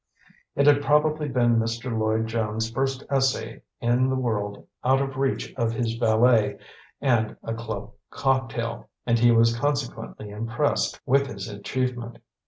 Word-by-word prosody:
It 140 - +3
had 145 -1 +6
probably 150 +1 +2
been 120 -3 +2
Mr. 115 +2 -2
Lloyd 110 0 +1
Jones' 110 0 -2
first 135 +2 -1
essay 135 -1 0 0.2
in 120 +2 +2
the 130 - +1
world 105 -5 -2 0.2
out 130 +2 +4
of 135 -1 -2
reach 135 0 -1
of 115 -2 0
his 115 -1 -1
valet 115 -1 +3 0.4
and 120 -5 +1
a 115 - -3
club 110 -2 -5 0.2
cocktail; 120 -3 -1 0.2
and 120 -1 +2
he 120 +1 +5
was 115 0 +4
consequently 105 - -3
impressed 115 +7 -1
with 140 +1 +3
his 100 -5 -6
achievement. 120 +3 -3
120 Hz, 145 wpm, -25 LUFS, 115-130 Hz, 0.4 s, had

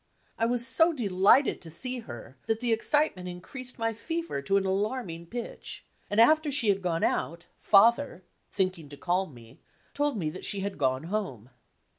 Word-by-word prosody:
I 230 - +2
was 240 0 +1
so 325 +5 +3
delighted 210 - +3
to 165 - -10
see 250 +10 -3
her 125 - -10
that 225 -1 0
the 240 -1 +1
excitement 225 -6 +1
increased 245 +9 -7
my 225 0 -1
fever 330 - -4
to 195 +8 +2
an 195 - 0
alarming 190 -3 -2
pitch, 240 +5 -7 0.2
and 205 - 0
after 310 +6 +5
she 260 -6 +1
had 195 -1 +2
gone 170 -3 -1
out. 170 +2 -1
Father, 225 0 +4 0.3
thinking 185 -6 -2
to 145 - -11
calm 180 +1 -1
me, 115 -1 -15 0.3
told 290 -4 0
me 155 -5 -2
that 185 - -9
she 200 -2 -1
had 200 0 -4
gone 130 -1 +1
home. 165 - -4
200 Hz, 175 wpm, -28 LUFS, 170-245 Hz, 0.3 s, after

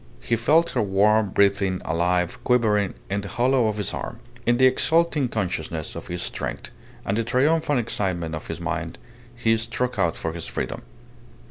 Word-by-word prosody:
He 120 - 0
felt 155 +9 +3
her - - 0
warm, 105 +1 +3
breathing, 100 -1 +2
alive, 90 +2 0
quivering 105 -5 +2
in 100 +1 -1
the 100 - -7
hollow 120 +2 +2
of 105 -1 -2
his 105 - -1
arm. - - -5 0.3
In 120 0 +4
the 130 - +5
exulting 155 +2 +3
consciousness 85 -8 -3
of - - -7
his 90 0 -3
strength, - - -4 0.3
and 100 - 0
the - - +1
triumphant 145 +5 +2
excitement 90 -7 -2
of 80 - -6
his - - -5
mind, - - -3 0.4
he 115 -1 +2
struck 115 +1 -2
out 85 -4 +2
for 80 - -4
his 85 -6 -6
freedom. - - -4
105 Hz, 170 wpm, -24 LUFS, 90-125 Hz, 0.4 s, the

